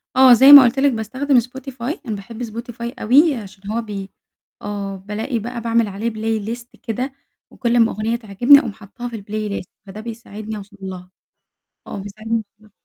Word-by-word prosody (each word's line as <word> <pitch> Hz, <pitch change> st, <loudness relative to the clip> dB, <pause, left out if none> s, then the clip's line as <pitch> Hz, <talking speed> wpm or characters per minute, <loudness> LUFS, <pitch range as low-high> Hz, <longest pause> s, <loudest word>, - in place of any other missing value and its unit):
آه 260 Hz, -1 st, +8 dB
زي 265 Hz, +4 st, +8 dB
ما 285 Hz, -2 st, +12 dB
قلت 250 Hz, +2 st, +1 dB
لِك 280 Hz, 0 st, +4 dB
باستخدم 255 Hz, +4 st, +1 dB
spotify، 260 Hz, -, -6 dB
أنا 220 Hz, -4 st, -3 dB
باحب 220 Hz, +4 st, -8 dB
Spotify 235 Hz, +1 st, -6 dB
أوي 285 Hz, +7 st, +5 dB
عشان 200 Hz, -2 st, -8 dB
هو 230 Hz, +2 st, -1 dB
بي 200 Hz, -3 st, -7 dB, 0.5 s
آه 200 Hz, -1 st, -4 dB
بالاقي 210 Hz, +5 st, -4 dB
بقى 235 Hz, +2 st, -6 dB
باعمل 230 Hz, -1 st, +1 dB
عليه 205 Hz, +4 st, -3 dB
playlist 225 Hz, +1 st, -3 dB, 0.2 s
كده 255 Hz, +3 st, -3 dB, 0.4 s
وكل 240 Hz, -2 st, -1 dB
أما 230 Hz, -1 st, +4 dB
أغنية 215 Hz, +3 st, -1 dB
تعجبني 235 Hz, +5 st, +5 dB
أقوم 235 Hz, -, -4 dB
حاطاها 215 Hz, +5 st, -9 dB
في 235 Hz, -, -7 dB
الplaylist، 205 Hz, -2 st, -4 dB, 0.2 s
فده 200 Hz, +2 st, -8 dB
بيساعدني 220 Hz, -2 st, -7 dB
أوصل 205 Hz, 0 st, -12 dB
لها 185 Hz, -1 st, -8 dB, 0.8 s
آه -, -, -6 dB
بيساعدني 215 Hz, +3 st, -7 dB
أوصل 220 Hz, -, -4 dB, 0.2 s
لها. 215 Hz, -1 st, -22 dB
225 Hz, 175 wpm, -20 LUFS, 205-245 Hz, 0.8 s, ما